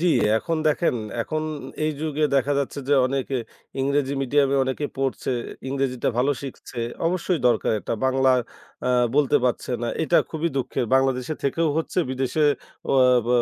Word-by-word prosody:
জি, 180 - +1 0.3
এখন 165 +7 -2
দেখেন 155 +1 +2 0.3
এখন 155 +4 -3 0.4
এই 155 - +2
যুগে 155 -1 0
দেখা 135 +2 +2
যাচ্ছে 140 0 -3
যে, 145 - +5
অনেকে 135 0 -2 0.4
ইংরেজি 140 0 +1
মিডিয়ামে 140 +1 +2
অনেকে 130 +3 -2
পড়ছে। 135 -1 -1 0.4
ইংরেজিটা 135 -2 -1
ভালো 135 +3 +3
শিখছে। 130 -2 -8 0.3
অবশ্যই 180 -1 0
দরকার 120 -2 +2
এটা। 95 - -3
বাংলায় 130 -1 +3 0.5
আ - - +2 0.3
বলতে 145 -2 +4
পারছে 125 - -1
না, 120 - -1
এটা 170 +2 +4
খুবই 160 +1 -1
দুঃখের। 130 -1 -1
বাংলাদেশে 135 +2 +1
থেকেও 160 +4 +1
হচ্ছে 160 +3 -1
বিদেশে 130 +4 0 0.5
অয়া 130 -2 +5
ব - - -3
135 Hz, 150 wpm, -24 LUFS, 130-150 Hz, 0.5 s, যে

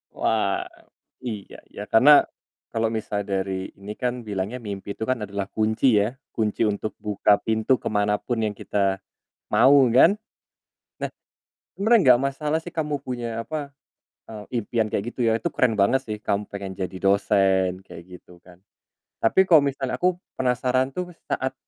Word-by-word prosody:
Wah - - 0 0.6
iya, 110 -5 -6
ya 105 - -7
karena 145 +6 +6 0.4
kalau 115 0 -1
misal 105 -2 -3
dari 95 -1 -3
ini 105 +2 -7
kan 125 -1 -2
bilangnya 105 +2 -4
mimpi 100 -2 -6
itu - - -6
kan 130 -4 -1
adalah 100 -1 -4
kunci 110 +2 +2
ya. 110 +4 -3 0.2
Kunci 110 -2 -1
untuk 105 +1 -3
buka 105 -1 +3
pintu 110 +3 +1
kemanapun 105 +3 -1
yang 105 - -2
kita 100 -1 -1 0.5
mau 130 +5 +6
kan. 165 +10 +6 0.9
Nah - - -2 0.7
sebenernya 200 - +5
gak 120 - 0
masalah 150 +3 -2
sih 175 - -8
kamu 150 -3 -2
punya 120 -3 -4
apa, 145 +1 -5 0.6
eee, 105 -2 -8 0.2
impian 110 +1 -1
kayak 100 - -1
gitu - - -8
ya - - +3
itu - - -2
keren 125 -3 +2
banget 100 +7 +3
sih 105 -1 -3
kamu 100 +1 -1
pengen 100 -1 -6
jadi 95 0 -5
dosen 95 -1 +2
kayak 85 - -10 0.2
gitu 90 0 -19
kan. 90 -1 -17 0.7
Tapi 190 +12 +4
kalau 160 -4 +8
misalnya 135 -2 -2
aku 180 0 +2 0.2
penasaran 130 +1 +1
tuh 180 +2 -4 0.2
saat 130 0 -1
110 Hz, 155 wpm, -24 LUFS, 100-130 Hz, 0.9 s, kalau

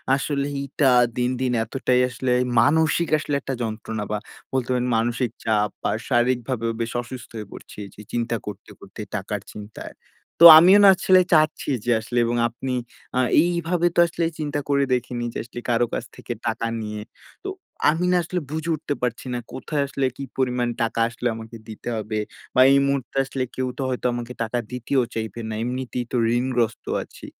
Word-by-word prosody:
আসলে 140 0 -1 0.2
এইটা 140 0 +1 0.3
দিন, 125 0 +1
দিন 130 -1 +1
এতটাই 125 +2 +1
আসলে 125 +1 -2 0.3
মানসিক 160 +6 +3
আসলে 145 -1 -2
একটা 135 - -4
যন্ত্রণা। 110 -1 -4
বা 105 - 0 0.4
বলতে 130 -2 -1
পারেন 125 0 0
মানসিক 120 +2 0 0.2
চাপ 105 -1 +2
বা - - +1 0.2
শারীরিকভাবেও 120 -1 +1
বেশ 115 0 -2
অসুস্থ 120 -1 -9
হয়ে 105 -2 -6
পড়ছি। - - -11
এই - - -11
যে - - -11
চিন্তা 120 0 -1
করতে, 105 -2 -8
করতে - - -10
টাকার - - -3
চিন্তায়। 105 0 -9 0.5
তো - - +11
আমিও 185 +5 +7
না 200 - +9
আসলে 185 0 +5
চাচ্ছি 155 -1 +2 0.2
যে 120 - +2
আসলে 120 +2 -5
এবং 120 +1 -1
আপনি 125 +3 -5 0.4
আ - - +3 0.2
এইভাবে 170 0 +1
তো - - +3
আসলে 170 0 -2
চিন্তা 145 -1 -2
করে 140 -1 +3
দেখিনি। 125 -1 -2
যে - - -5
আসলে 120 +1 -9
কারো 120 0 +3
কাছ - - -2
থেকে - - -6
টাকা 115 - -1
নিয়ে। 105 -1 -5 0.4
তো 390 - -4 0.4
আমি 165 +4 +1
না 180 - +4
আসলে 180 +2 -2
বুঝে 160 +1 -3
উঠতে 145 -1 -3
পারছি 125 -1 -2
না। 120 - -1
কোথায় 140 +2 -2
আসলে 140 0 -1
কি 140 - -5
পরিমাণ 125 -2 +1
টাকা 115 0 -1
আসলে 120 +1 -3
আমাকে 115 +1 -9
দিতে 110 +2 -7
হবে। 110 0 -3 0.4
বা 130 - +6
এই 140 - +6
মুহূর্তে 135 -3 -2
আসলে 135 -1 -3
কেউ 130 0 -1
তো - - -3
হয়তো 125 -1 -3
আমাকে 120 0 -5
টাকা 115 +2 -2
দিতেও 125 +1 0
চাইবে 110 0 -4
না। - - -3
এমনিতেই 125 0 -3
তো - - -2 0.2
ঋণগ্রস্ত 120 -2 -1 0.2
আছি। - - -14
125 Hz, 185 wpm, -23 LUFS, 115-140 Hz, 0.5 s, তো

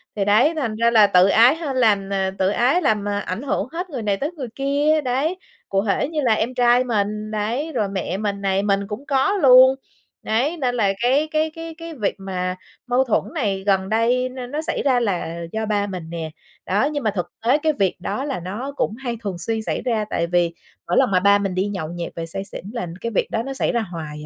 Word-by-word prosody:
Thì 200 -2 0
đấy, 220 +10 +4
thành 245 -8 -2
ra 230 +1 +2
là 215 -3 +6
tự 185 -1 +5
ái 235 +7 +6
hên 310 -5 -4
làm 205 -5 +3
ờ, 190 -1 0
tự 190 0 +3
ái 250 - +2
làm, 215 - +1
ờ, 205 0 -1
ảnh 195 +1 -4
hưởng 250 -6 -1
hết 355 +2 -4
người 265 -7 -4
này 205 -2 0
tới 290 +8 -2
người 290 -8 -6
kia, 290 +3 +2
đấy. 280 +7 -1 0.3
Cụ 195 +1 0
thể 220 +7 0
như 315 -2 -2
là 235 -3 +4
em 225 +3 -1
trai 245 0 +4
mình, 215 -2 -2
đấy, 230 +9 -2
rồi 215 -6 0
mẹ 190 -1 -3
mình 200 -1 -3
này, 195 0 +1
mình 200 -1 0
cũng 220 +7 -6
có 285 +6 +2
luôn, 260 -4 +7 0.5
đấy. 260 +10 0
Nên 250 -5 -1
là 200 -5 +2
cái 270 +6 +3
cái 310 0 +1
cái 330 0 -7
cái 330 0 -8
việc 210 -7 -1
mà 185 -1 -3 0.3
mâu 250 +2 +3
thuẫn 240 -5 +1
này 200 -9 -1
gần 190 -1 +2
đây 240 +3 +2
nó 255 -1 -7
nó 295 +5 -3
xảy 315 - -2
ra 260 -3 +3
là 170 -6 -2
do 220 0 -2
ba 205 -1 0
mình 180 -4 -6
nè, 165 -2 -5 0.3
đó. 205 +7 +1
Nhưng 290 -2 -2
mà 215 - +1
thực 180 -4 -4 0.2
tế 260 +4 +5
cái 310 0 +1
việc 195 -8 0
đó 200 +8 -3
là 275 -7 -3
nó 210 +11 -5
cũng 215 - 0
hay 240 -2 -4
thường 195 -4 -3
xuyên 220 +6 -2
xảy - - -2
ra. 225 -4 0
Tại 170 0 -1
vì 175 -1 +1 0.3
mỗi 175 - +1
lần - - +4
mà 185 - +4
ba 200 +2 +5
mình 195 -2 -2
đi 190 +2 0
nhậu 185 -6 -4
nhẹt 170 0 -5
về 165 - -4
say 170 +4 -5
xỉn 195 - -9
là 235 -7 -3
cái 230 - -3
việc - - 0
đó 225 - -1
nó 270 +2 -5
xảy 265 - 0
ra 235 - 0
hoài 160 -6 -7
220 Hz, 245 wpm, -21 LUFS, 195-265 Hz, 0.5 s, luôn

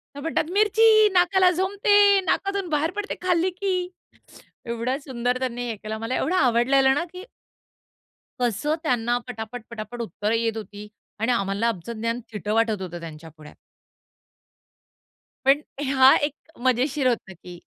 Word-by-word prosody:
तर - - -7
म्हणतात, 320 +1 -2
"मिरची! 435 +1 +5
नाकाला 365 +1 +4
झोंबते, 400 +2 +4
नाकातून 395 -1 -1
बाहेर 310 +2 0
पडते 415 0 -4
खाल्ली 360 0 +1
की" 365 -1 -2 0.8
एवढं 235 +3 -2
सुंदर 250 -2 -2
त्यांनी 245 -1 -3
हे 225 - -3
केलं. 215 +1 -6
मला 225 +3 -3
एवढं 350 +7 0
आवडलेलं 265 0 +3
ना 340 - 0
की 365 +2 -9 1.2
कसं 245 +6 0
त्यांना 240 -5 0
पटापट-पटापट 230 0 -7
उत्तरं 210 +2 -2
येत 225 -1 0
होती 210 -1 -8 0.3
आणि 230 +3 +1
आम्हाला 200 0 0
आमचं 225 0 -4
ज्ञान 230 +2 -2
थिटं 210 0 -3
वाटत 225 -3 +1
होतं 175 -2 -6
त्यांच्यापुढे. 155 -1 -11 1.9
पण 280 +2 +4 0.3
हा 265 -1 +7
एक 290 0 -2 0.3
मजेशीर 260 +2 +2
होतं 215 -6 -2
की 175 0 -13
250 Hz, 135 wpm, -24 LUFS, 225-345 Hz, 1.9 s, हा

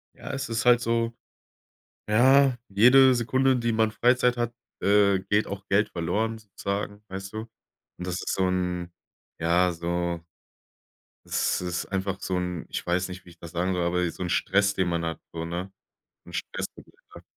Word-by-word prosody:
Ja, - - -7
es 135 0 -3
ist 115 +1 -2
halt 120 -1 +6
so 115 0 0 1.0
ja, 130 +4 +5
jede 125 +6 +6
Sekunde, 130 +2 +2
die 120 -1 0
man 110 0 +2
Freizeit 125 +1 +3
hat, 120 -1 -1 0.3
äh, 100 -1 +4
geht 105 +2 +1
auch 100 0 -7
Geld 100 +2 +3
verloren 105 +7 -1
sozusagen, 100 0 -5
weißt 95 +1 -7
du? - - -3 0.6
Und 90 - -5
das 90 - -2
ist 90 - -2
so 95 -1 +1
'n 90 -1 -2 0.5
ja, 90 +2 +3
so 85 0 -2 1.1
Das - - 0
ist 90 -1 -2
einfach 95 0 -2
so 95 - -2
'n 90 -2 -3
ich - - -4
weiß 90 +1 0
nicht, 95 0 -9
wie 90 - -15
ich 85 - -16
das 85 -1 -9
sagen 90 +2 0
soll, 90 - 0
aber 90 +1 +1
ey, 85 - 0
so 90 - -6
'n 90 - -3
Stress, 100 +2 +2
den 95 -3 0
man 85 -1 -1
hat, 80 - -4
so, 80 0 -4
ne? 90 +3 -4 0.5
'N - - -12
Stress, - - -4
den - - -12
man - - -26
hat. - - -11
95 Hz, 190 wpm, -26 LUFS, 90-115 Hz, 1.1 s, halt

